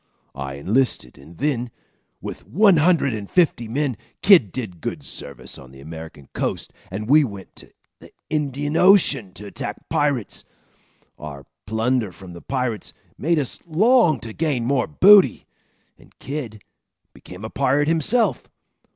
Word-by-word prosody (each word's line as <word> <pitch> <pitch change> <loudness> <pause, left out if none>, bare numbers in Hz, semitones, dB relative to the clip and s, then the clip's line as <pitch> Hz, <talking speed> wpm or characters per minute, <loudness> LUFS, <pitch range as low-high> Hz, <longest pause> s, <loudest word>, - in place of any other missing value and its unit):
I 70 0 -6
enlisted 95 - -1
and 80 +5 -15
then, 125 -4 -1 0.5
with - - -8
one 200 0 +4
hundred 155 -4 +3
and 105 -2 -6
fifty 160 -10 +2
men, 135 +2 -1 0.3
Kidd 175 - +6
did 100 -10 -6
good - - -5
service 65 -3 -8
on 65 - -13
the 65 +1 -15
American 80 -1 -10
coast, - - -3 0.2
and 105 +3 -5
we 150 +4 +6
went 100 -7 -8
to - - -12 0.3
the - - -16 0.2
Indian 145 -1 -2
Ocean 180 - +4
to 105 - -9
attack 105 0 -7
pirates. 145 -8 -1 0.8
Our 70 -2 -9 0.2
plunder 110 0 0
from 90 -1 -12
the 85 - -11
pirates 125 -5 -3 0.2
made 165 +3 0
us 140 -5 -2
long 185 - +4
to 115 -1 -7
gain 145 -6 -1
more 130 0 +1
booty, 185 - +6 0.5
and - - -22
Kidd 125 -8 -6 0.5
became 90 +4 -11
a 110 - -7
pirate 140 +2 +1
himself. 205 +9 +1
125 Hz, 145 wpm, -22 LUFS, 100-155 Hz, 0.8 s, Kidd